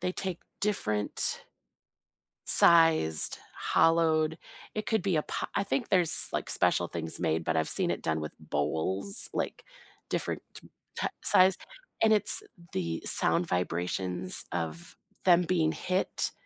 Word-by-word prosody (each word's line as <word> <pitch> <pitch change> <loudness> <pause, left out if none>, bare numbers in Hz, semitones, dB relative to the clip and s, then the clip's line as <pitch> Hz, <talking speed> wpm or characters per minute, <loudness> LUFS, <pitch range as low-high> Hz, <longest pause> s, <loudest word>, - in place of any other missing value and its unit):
they 180 - -2
take 185 -2 -5 0.2
different 110 - -2 1.0
sized, 165 - +5 0.2
hollowed 160 -1 +2 0.4
It 215 - -3
could 220 0 0
be 190 -3 0
a 155 - +1
po - - -4
I 200 - 0
think 245 +4 -2
there's, 180 -4 +3
like, - - -3
special 90 -1 +1
things 80 -1 -3
made, 80 -1 -1
but 80 0 -1
I've 80 -1 0
seen - - +1
it - - -3
done 80 -1 -1
with 75 - -7
bowls, 80 - -2
like, - - -4 0.5
different - - -3
t - - -13 0.3
ta - - -1
size, 185 0 +6 0.5
and 220 -1 +4
it's 210 -1 +3 0.3
the 85 -3 -3
sound 90 - +3
vibrations 90 +1 -2
of 125 - -5 0.3
them 180 -1 +5
being 165 -2 0
hit 185 +2 -2
155 Hz, 140 wpm, -28 LUFS, -, 1.0 s, size